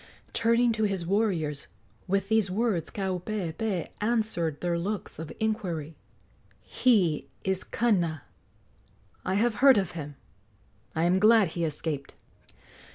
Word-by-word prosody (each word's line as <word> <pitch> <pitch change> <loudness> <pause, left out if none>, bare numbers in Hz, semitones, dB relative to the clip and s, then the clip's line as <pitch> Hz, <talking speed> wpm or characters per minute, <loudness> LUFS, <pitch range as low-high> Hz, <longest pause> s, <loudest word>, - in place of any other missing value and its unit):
Turning 235 +1 +3
to 220 -1 +1
his 195 -4 -1
warriors, 175 -7 0 0.4
with 195 +1 0
these 220 -2 +2
words 200 -4 0
Kaupeepee 190 -1 -3
answered 210 -9 0
their 175 -1 0
looks 200 -2 -4
of 160 -1 -6
inquiry: 180 -9 -2 0.6
"He 190 - +2 0.2
is 190 -1 -1
Kana. 175 - 0 1.0
I 185 - -1
have 230 +3 +2
heard 270 -3 +8
of 190 -4 0
him. 145 -4 -7 0.8
I 160 - +1
am 180 +2 +3
glad 215 -2 +5
he 170 +1 -3
escaped." 150 -2 -4
190 Hz, 120 wpm, -28 LUFS, 165-220 Hz, 1.0 s, heard